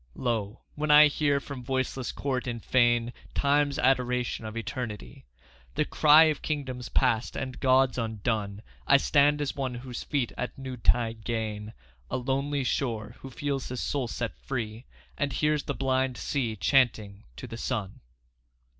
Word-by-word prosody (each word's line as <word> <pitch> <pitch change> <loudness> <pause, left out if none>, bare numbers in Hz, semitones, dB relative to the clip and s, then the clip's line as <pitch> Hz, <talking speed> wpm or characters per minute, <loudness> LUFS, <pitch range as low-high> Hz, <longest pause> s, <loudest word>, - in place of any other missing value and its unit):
Lo! 115 -3 -2
when 150 +1 -3
I 150 +1 +9
hear 145 -1 +2
from 140 -2 -8
voiceless 130 0 -2
court 130 -2 -3
and 115 -2 -5
fane 120 -1 +3 0.2
Time's 145 0 +2
adoration 125 -3 +1
of 110 +1 -6
Eternity 110 - -6 0.2
— 60 +1 -28
The - - +1
cry 155 +1 +6
of 155 -2 +1
kingdoms 130 -5 -4
past 115 0 +1
and 130 -1 -5
gods 130 -1 +3
undone 110 -2 -2 0.2
I 140 - +7
stand 145 +1 +3
as 145 - -2
one 130 -3 -3
whose 125 0 -6
feet 135 -5 -1
at 125 - -4
noontide 120 -3 0
gain 110 -2 -3 0.4
A - - -1
lonely 135 +2 -1
shore; 115 -4 -2
who 135 - -9
feels 140 +1 -3
his 125 0 -4
soul 135 -4 -1
set 115 0 -4
free, 115 -2 -5 0.3
And 140 -1 0
hears 150 +1 +1
the - - -2
blind 130 -1 0
sea 120 -6 -2
chanting 110 -4 +1
to - - -8
the 115 - -8
sun. 100 -4 -3
125 Hz, 155 wpm, -28 LUFS, 115-140 Hz, 0.4 s, I